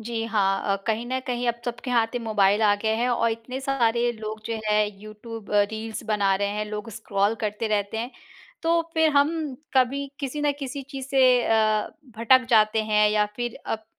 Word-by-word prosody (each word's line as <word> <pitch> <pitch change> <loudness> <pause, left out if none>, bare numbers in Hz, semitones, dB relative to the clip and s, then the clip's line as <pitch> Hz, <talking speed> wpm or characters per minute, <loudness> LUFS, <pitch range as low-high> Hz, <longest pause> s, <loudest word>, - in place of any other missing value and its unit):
जी, 225 0 -3
हाँ। 200 -3 +1
अ, - - +1
कहीं 225 +1 0
न 260 +1 -1
कहीं 245 -1 -2
अब 235 0 -2
सबके 245 +1 -4
हाथ 235 0 +1
मोबाइल 210 -2 +2
आ 205 -1 +5
गए 220 0 +2
हैं 240 +2 0
और 235 -1 +1
इतने 230 +4 -5
सारे 240 -3 +1
लोग 215 -1 -7
जो 230 - -2
हैं 210 0 +3
यूट्यूब 215 0 -10
अ, 205 - +6
रील्स 220 0 -5
बना 205 -3 +2
रहे 200 +1 -1
हैं, 210 +1 -2
लोग 210 +2 -6
स्क्रॉल 205 -1 0
करते 210 +2 -2
रहते 210 0 -1
हैं। 240 +3 -3 0.5
तो 335 +1 +3
फिर 320 0 +4
हम 285 +1 +4 0.4
कभी 265 +2 +2
किसी 280 +1 -3
न 290 -1 +2
किसी 275 0 -5
चीज़ 270 -2 -6
से 255 -2 +4
अ, 215 -1 +2 0.3
भटक 255 +3 +4
जाते 220 -1 +4
हैं, 210 -1 +3
या 210 0 +2
फिर 240 -1 -4
अब 220 0 -3
225 Hz, 195 wpm, -25 LUFS, 215-250 Hz, 0.5 s, अ